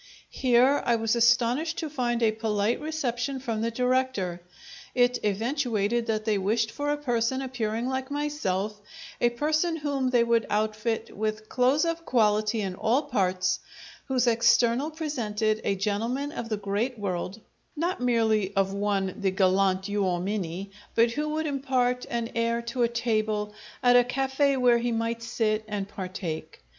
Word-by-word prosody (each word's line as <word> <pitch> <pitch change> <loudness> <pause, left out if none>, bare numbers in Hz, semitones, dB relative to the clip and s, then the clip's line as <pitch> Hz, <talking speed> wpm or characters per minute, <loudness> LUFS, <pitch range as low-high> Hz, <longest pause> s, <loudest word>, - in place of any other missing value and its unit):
Here 255 +2 +3
I 240 - +2
was 225 0 +1
astonished 240 +7 +2
to 320 - -2
find 240 -5 -1
a 220 - +4
polite 215 +1 0
reception 275 -4 -2
from 230 -4 -3
the 230 - 0
director. 250 -7 0 0.5
It 245 0 +3
eventuated 230 +1 0
that 215 -1 -1
they 215 -3 +1
wished 225 +4 0
for 290 +3 -3
a 295 - +1
person 245 -2 0
appearing 240 -3 -2
like 260 0 -2
myself 215 -9 -2 0.4
a 240 - +5
person 310 +7 0
whom 285 -4 -1
they 245 -2 +4
would 235 -1 +2
outfit 215 +2 -1
with 215 +1 -3
clothes 260 +6 +3
of 335 0 -2
quality 215 -3 +2
in 190 -2 -2
all 235 +9 +1
parts, 185 -8 0 0.5
whose 255 -2 +1
external 235 +3 +3
presented 225 -9 -1
a 200 - +1
gentleman 230 +9 -1
of 235 -7 -5
the 215 - -1
great 205 +5 -2
world, 190 0 -3 0.4
not 335 0 -2
merely 220 -5 +1
of 195 0 +1
one 200 -2 0
the 195 - +2
galant 190 0 +2
uomini, 195 -1 -2 0.2
but 230 0 +4
who 300 +5 -2
would 310 +1 -1
impart 260 -3 0
an 235 0 -2
air 230 0 0
to 235 +2 -3
a 235 - +5
table 215 -3 -1 0.3
at 245 0 +6
a 245 - +7
cafe' 270 +2 +1
where 245 -2 +4
he 240 +1 -1
might 230 0 -1
sit 225 -2 0
and 205 -2 -3
partake. 180 -5 -6
230 Hz, 155 wpm, -27 LUFS, 210-260 Hz, 0.5 s, a